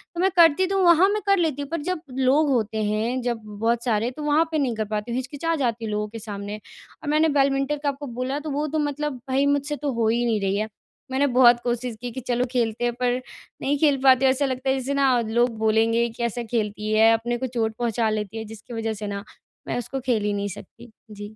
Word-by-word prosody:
तो - - -4
मैं 380 - +4
करती 340 +1 +6
तो 390 +1 0
हूँ 375 - +3
वहाँ 345 +3 +6
मैं 420 0 -1
कर 395 0 +5
लेती 310 -5 0
हूँ। 280 - -6
पर 335 -3 -2
जब 365 0 -3 0.2
लोग 280 +3 +3
होते 220 -4 0
हैं 220 +5 -1
जब 235 -2 -2
बहुत 225 +3 -1
सारे 230 -1 +1
तो 300 +4 -8
वहाँ 300 +2 +3
पे 315 - 0
नहीं 265 -6 0
कर 215 0 -2
पाती 210 +2 -4
हूँ - - -2
हिचकिचा 285 +6 -2
जाती 235 -5 -1
हूँ 215 - -3
लोगों 210 0 -1
के 225 +2 -8
सामने 205 -1 -6 0.5
और 290 - -3
मैंने 310 +1 +3
बैडमिंटन 275 0 +1
का 285 - +2
आपको 280 +1 -6
बोला 255 +4 -3
तो 305 +1 -6
वो 290 +2 -1
तो 310 +1 -1
मतलब 290 -2 -2
भई 270 +2 +2
मुझसे 285 +1 0
तो 290 -1 -3
हो 230 -1 +1
ही 240 +1 +1
नहीं 225 -3 +1
रही 195 0 0
है। 215 +1 -1 0.4
मैंने 280 +2 +2
बहुत 240 -1 +7
कोशिश 240 -1 -2
की 245 -1 -4
कि 260 - -6
चलो 245 0 +1
खेलते 235 -2 -1
हैं 240 - 0
पर 250 0 0 0.4
नहीं 285 +1 +1
खेल 290 -3 +4
पाती 265 0 +6
ऐसा 265 +2 +3
लगता 260 0 -2
है 265 - +3
जैसे 265 +2 -3
ना 270 -3 +3
लोग 235 +1 +1
बोलेंगे 225 +2 +2
कि 230 - -10
कैसा 235 0 -2
खेलती 215 -2 -2
है 220 +1 +6
अपने 240 +2 -1
को 260 - -3
चोट 230 -3 -1
पहुँचा 230 -2 0
लेती 215 0 -3
है। 220 - -5
जिसकी 225 +2 -11
वजह 225 -1 -2
से 210 0 -6
ना 200 0 -4 0.4
मैं - - -2
उसको 265 +3 -4
खेल 230 -5 +1
ही 205 0 0
नहीं 200 0 -2
सकती। 225 +4 -12 0.2
जी। 205 +1 -9
245 Hz, 250 wpm, -24 LUFS, 225-280 Hz, 0.5 s, बहुत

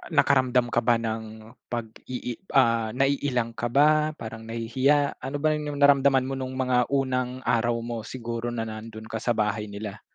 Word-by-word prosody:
nakaramdam 130 -3 +3
ka 120 - +3
ba 120 0 +3
ng 110 0 -5 0.2
pag-ii 120 +1 -5 0.2
ah, 115 -4 +3
naiilang 135 -3 +1
ka 120 - -2
ba, 150 +4 +3
parang 115 -2 -8
nahihiya, 130 +6 +1
ano 135 +3 -4
ba 155 - +4
'yong 150 -1 -4
naramdaman 140 -2 +5
mo 135 - -3
no'ng 130 0 -4
mga 130 -1 +1
unang 130 -2 -1
araw 120 +1 +1
mo, 120 -1 -4
siguro 120 -1 -4
na 115 -1 -2
nando'n 110 0 -8
ka 110 - -2
sa 120 0 0
bahay 105 0 0
nila? 100 0 -7
120 Hz, 165 wpm, -26 LUFS, 115-135 Hz, 0.2 s, naramdaman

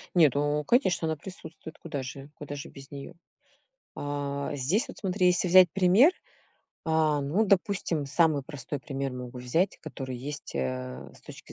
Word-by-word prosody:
Нет, 155 -7 +5
ну 145 +1 +1
конечно, 190 - +2
она 160 - 0
присутствует. 160 -1 -10
Куда 145 -5 -5
же 135 +2 -8
куда 145 0 -7
же 140 - -7
без 135 -1 -13
неё? 140 +4 -8 0.8
А 145 0 -3
здесь 175 - +1
вот - - -10
смотри, 190 -1 +1
если 180 +1 +3
взять 185 0 +8
пример, 195 - +6 0.7
а, 160 -2 +2
ну, 155 +11 +1
допустим, 185 -6 +1
самый 155 0 +3
простой 145 -1 -6
пример 135 0 -4
могу 125 0 -7
взять, 160 +10 0
который 130 -2 -6
есть, 140 - -7
э, 65 0 -4
с - - -16
точки - - -12
145 Hz, 160 wpm, -28 LUFS, 135-180 Hz, 0.8 s, взять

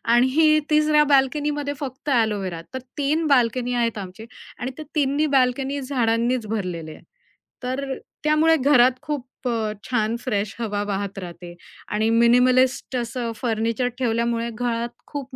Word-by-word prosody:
आणि 305 +5 +4
तिसऱ्या 305 0 +4
बाल्कनीमध्ये 290 +1 +1
फक्त 270 0 -6
एलोवेरा, 200 -7 0
तर 260 - -3 0.2
3 300 +3 +1
बाल्कनी 250 -2 +2
आहेत 235 -2 0
आमचे 195 +2 -8 0.3
आणि 250 +2 -3
त्या 310 - -7
तिन्ही 290 +1 +2
बाल्कनी 265 +2 +1
झाडांनीच 240 -2 0
भरलेले 180 -7 -4
आहेत. - - -13 0.6
तर 265 +2 -2 0.3
त्यामुळे 305 +2 +4
घरात 260 -3 +5
खूप 295 -4 -3 0.2
अ, 225 -3 -1
छान 230 -3 0
फ्रेश 210 -4 -2
हवा 210 -3 -2
वाहत 200 -1 -3
राहते. 175 -1 -9 0.3
आणि 215 +1 0
मिनिमलिस्ट 250 +3 +3
असं 235 -1 -2
फर्निचर 230 +2 -1
ठेवल्यामुळे 235 -1 0
घरात 235 +1 -2 0.2
खूप 275 -2 -7
245 Hz, 135 wpm, -23 LUFS, 225-275 Hz, 0.6 s, घरात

